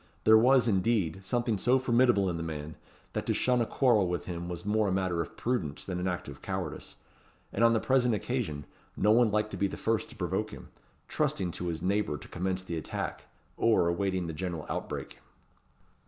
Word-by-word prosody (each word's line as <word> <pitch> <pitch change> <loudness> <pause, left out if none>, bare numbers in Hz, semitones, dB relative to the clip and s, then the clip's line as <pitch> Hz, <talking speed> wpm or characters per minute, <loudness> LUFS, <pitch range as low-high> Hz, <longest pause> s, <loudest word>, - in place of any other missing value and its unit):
There 110 - +7
was, 125 +2 +5
indeed, 95 -4 +1
something 120 0 0
so 125 +5 +4
formidable 120 -5 +3
in 85 -2 -1
the - - -4
man, 80 -1 -5 0.4
that - - -3
to - - +1
shun 125 -1 +2
a 115 - 0
quarrel 115 -8 +3
with 90 0 -2
him 85 -1 -5
was 85 0 -6
more 105 0 +2
a - - 0
matter 95 -2 0
of 80 - -7
prudence 95 - -2
than 90 -2 -3
an 90 - -1
act 90 -1 -3
of 70 -1 -9
cowardice; - - -5 0.6
and 115 - +1
on 115 0 +6
the 110 - +3
present 125 -3 +2
occasion, 105 - -3 0.3
no 105 - +4
one 120 0 +5
liked 105 +1 0
to - - -5
be 100 - +2
first 110 +1 -1
to - - -12
provoke - - -2
him; - - -11 0.4
trusting 90 -2 -1
to 90 - -5
his 80 -1 -3
neighbour 100 -5 0
to - - -12
commence 95 +1 -2
the 85 -3 -4
attack, 80 - -4 0.3
or 110 -7 +3
awaiting 95 0 0
the 80 - -4
general 85 -1 -4
outbreak. - - -5
95 Hz, 200 wpm, -30 LUFS, 85-115 Hz, 0.6 s, There